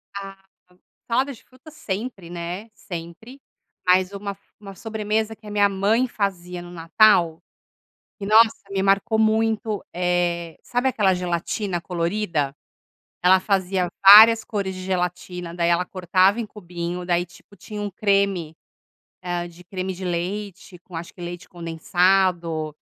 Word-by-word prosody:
Ah, 195 -1 -7 0.7
salada 260 +4 +1
de 235 - -15
frutas 260 +5 -17
sempre, 195 - -5
né? 175 +5 -6
Sempre. 175 +10 -9 0.5
Mas 185 +1 +3
uma 200 0 -5
f 195 - -32 0.2
uma 195 -2 -10
sobremesa 220 +1 -2
que 215 - -18
a - - -7
minha 205 -1 +3
mãe 205 +6 +1
fazia 180 -5 -3
no 175 - -11
Natal, 170 -1 +3 0.8
e 200 - -5
nossa, 220 +2 +6 0.2
me 195 -1 0
marcou 195 +3 +2
muito, 220 -1 +1
eh, 175 -1 -1
sabe 245 +2 -1
aquela 205 -6 +2
gelatina 180 +1 -2
colorida? 170 -4 -2 0.7
Ela 185 +1 +6
fazia 185 -2 0 0.2
várias 220 +3 +10
cores 200 -4 -3
de 185 - -7
gelatina, 180 -1 -3
daí 170 -1 0
ela 170 +1 +2
cortava 185 +3 +2
em 235 - -2
cubinho, 175 -3 -6
daí, 175 0 +1
tipo, 175 +3 -19
tinha 210 +3 -8
um 205 - -3
creme, 195 -5 0 0.7
ah, 175 -1 -3
de 175 +1 -15
creme 185 +1 -4
de 185 +1 -9
leite 185 +2 -4
com, 180 - -12
acho 165 +1 -7
que, 180 - -13
leite 175 0 -7
condensado. 170 -1 0
190 Hz, 145 wpm, -23 LUFS, 175-210 Hz, 0.8 s, várias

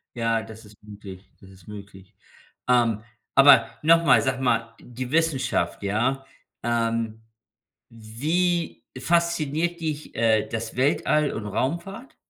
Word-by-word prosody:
Ja, 115 -1 0
das 110 0 -12
ist 105 0 -17
möglich, 100 -2 -12
das 95 - -16
ist 95 -2 -18
möglich. 100 -2 -12 0.5
Ähm, 115 -4 +2 0.3
aber 140 +1 +7
noch 165 +2 +5
mal, 125 -7 +5
sag 130 +3 -2
mal, 115 -3 0
die 125 +1 -7
Wissenschaft, 145 - 0
ja? 120 +7 -1 0.4
Ähm, 115 -1 -1 0.7
wie 150 +8 -2
fasziniert 170 +1 0
dich, 155 -2 -5
äh, 110 -1 +2
das 115 0 -5
Weltall 145 +3 +1
und 110 - -5
Raumfahrt? 170 - -4
120 Hz, 120 wpm, -24 LUFS, 110-150 Hz, 0.7 s, aber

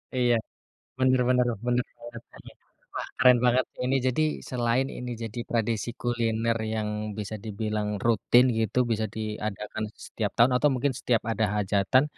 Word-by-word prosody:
Iya, 120 -1 +3 0.6
bener 130 -1 +3
bener 125 -1 +3 0.2
bener 125 0 +2
bener 120 0 -9
bener. - - -13 0.4
Wah, - - -4
keren 125 -1 +6
banget 125 +1 +4 0.2
ini 130 - +1
jadi 130 +5 +2 0.3
selain 125 +1 +1
ini 125 0 -5
jadi 115 +1 -5
tradisi 115 -1 -1
kuliner 115 -1 0 0.2
yang 110 -1 -1 0.3
bisa 105 +1 -4
dibilang 105 0 -2 0.2
rutin 120 +1 +4
gitu, 110 +2 0
bisa 110 -1 +1
diadakan 105 0 -4 0.2
setiap 105 -3 -2
tahun, 120 +3 +6
atau 150 - +5
mungkin 130 +2 0
setiap 120 -3 +1
ada 110 - +1
hajatan, 100 +6 +3
115 Hz, 150 wpm, -27 LUFS, 110-125 Hz, 0.6 s, keren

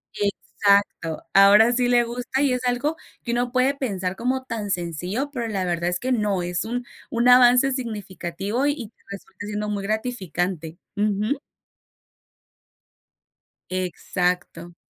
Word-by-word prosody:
exacto, 200 -4 0
ahora 205 +4 +7
sí 245 0 +2
le 240 -1 +5
gusta 245 +3 -3
y 275 -3 +3
es 250 - -1
algo 260 +6 0 0.3
que 235 - -3
uno 245 0 0
puede 255 +2 +2
pensar 190 -9 -2
como 255 +4 -1
tan 215 -4 -4
sencillo, 180 - -2
pero 235 -4 -3
la 195 -3 -1
verdad 175 0 0
es 180 - -1
que 255 - -2
no, 205 -5 0
es 175 0 -1
un 245 +2 -3 0.3
un 235 +1 +2
avance 250 +2 +7
significativo 205 -1 -3
y 285 -6 -2
te 230 - -35
resulta 200 +1 -9
siendo 210 0 -3
muy 205 -1 -2
gratificante, 185 - -3 0.2
ujú. 210 +5 0 2.3
Exacto. 180 -1 -2
210 Hz, 135 wpm, -23 LUFS, 185-245 Hz, 2.3 s, ahora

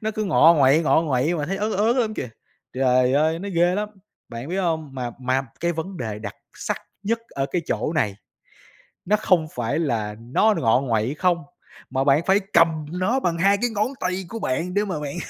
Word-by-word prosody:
nó 215 - 0
cứ 215 -1 -3
ngọ 170 -2 +6
nguậy 145 +2 +4
ngọ 160 - +3
nguậy 145 +1 +1
mà 150 -3 -2
thấy 195 +3 -2
ớn 210 +2 -1
ớn 220 +6 +2
lắm 220 -3 0
kìa. - - -4 0.5
Trời 130 0 +3
ơi, 155 +3 +2
nó 200 +3 -5
ghê 175 +2 +3
lắm! 210 +1 -2 0.4
Bạn 120 +3 -7
biết 180 - -2
hông, 160 -5 -1
mà 125 -2 -3
mà 130 +1 +1 0.2
cái 170 0 +1
vấn 175 +4 -5
đề 110 -6 -4
đặc 105 -2 -7 0.2
sắc - - -3 0.3
nhất 225 +3 0
ở 135 0 -2
cái 175 +2 -2
chỗ 155 - -1
này, 105 -11 0 0.9
nó 210 - +3
không 185 -6 +2
phải 120 +5 -1
là 110 -9 -1
nó 135 - +2
ngọ 115 +2 +3
nguậy 115 -1 0
không, 175 0 +1 0.5
mà 130 +1 0
bạn 140 +2 +4
phải 195 +1 +4
cầm 160 -2 +3
nó 185 +9 0
bằng 170 -7 -1
2 195 +4 +4
cái 245 - +2
ngón 215 0 0
tay 185 +1 -2
của 230 - -5
bạn 170 +3 -2
để 205 +2 +1
mà 180 -6 -3
bạn 145 -1 -5
165 Hz, 215 wpm, -23 LUFS, 130-195 Hz, 0.9 s, ngọ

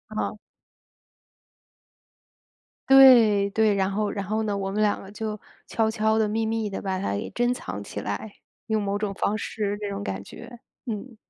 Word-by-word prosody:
好。 215 - -2 2.5
对， 240 -7 +7
对。 215 0 +3
然 190 -1 +1
后 210 +1 -1
然 200 -1 -4
后 215 +3 -1
呢， 210 -2 -1
我 195 0 -3
们 210 +2 -1
2 210 -1 +2
个 195 - -11
就 215 0 -5 0.3
悄 220 -1 +1
悄 220 0 +1
地、 220 -1 +2
秘 220 +2 -1
密 220 -1 -1
地 - - -4
把 190 -1 -2
它 185 - -2
给 100 - -3
珍 240 +1 +2
藏 105 - -6
起 100 - -7
来， 105 - -5 0.3
用 220 -1 0
某 200 0 -1
种 205 -1 -2
方 205 +2 -1
式 205 -1 -3
那 210 - -4
种 200 0 -4
感 95 - -4
觉， 235 - -11 0.3
嗯。 230 +2 -5
210 Hz, 185 characters per minute, -25 LUFS, 200-220 Hz, 2.5 s, 对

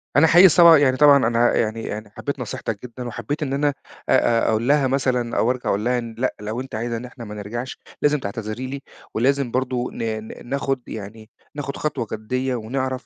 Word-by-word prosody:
أنا 150 +3 +6
حقيقي 175 +4 +8
صب 170 +1 +6
يعني 130 -3 +3
طبعًا 140 -4 +6
أنا 120 +1 +3
يعني 110 0 -1
يعني 105 0 -6
حبّيت 140 +6 -5
نصيحتك 115 -3 -4
جدًا 125 0 -7
وحبّيت 120 +6 -4
إن 135 -2 -3
أنا 145 +1 +1 0.4
آآ 115 -1 +3
أقول 110 +2 0
لها 145 -1 +4
مثلًا 125 -3 0
أو 120 - +3
أرجع 125 -1 -3
أقول 105 +3 0
لها 125 0 +2
إن 115 -1 -7
لأ، 130 +2 -1
لو 110 +4 -4
أنتِ 130 -3 -8
عايزة 115 +1 -2
إن 120 - -7
إحنا 125 -1 -10
ما 105 0 -8
نرجعش، 120 +5 -6 0.2
لازم 150 0 +3
تعتذري 110 +3 -5
لي 135 +1 -6 0.3
ولازم 135 +2 +1
برضه 125 -1 -1
ن - - -5 0.2
ن - - -11
ناخُد 135 -1 -1
يعني 110 +1 -8 0.3
ناخُد 140 -1 -5
خطوة 135 -6 -2
جدّية 125 +4 -2
ونعرف 130 +3 -3
125 Hz, 200 wpm, -22 LUFS, 115-135 Hz, 0.4 s, حقيقي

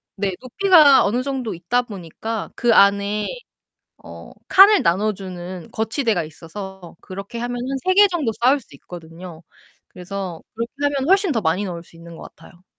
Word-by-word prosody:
네 200 -1 -2
높이가 300 0 +5
어느 240 +5 0
정도 265 -5 -3
있다 180 +9 -1
보니까 210 +1 -6
그 240 -2 +2
안에 200 +1 +3 0.8
어 - - -12 0.2
칸을 395 +2 +7
나눠 205 +5 +1
주는 180 -2 -8
거치대가 220 - -1
있어서 175 +3 -10
그렇게 195 +5 -8
하면은 245 +3 -3
3 370 - +3
개 410 +1 +7
정도 315 - -2
쌓을 265 +4 +4
수 175 - -18
있거든요. 170 +1 -11 0.5
그래서 180 -2 -7 0.2
그렇게 230 +1 -4 0.2
하면 275 +1 -2
훨씬 390 -1 +3
더 230 - 0
많이 170 +5 0
넣을 170 -2 -6
수 - - -22
있는 170 0 -12
것 - - -12
같아요. 175 +3 -18
205 Hz, 320 characters per minute, -21 LUFS, 175-250 Hz, 0.8 s, 칸을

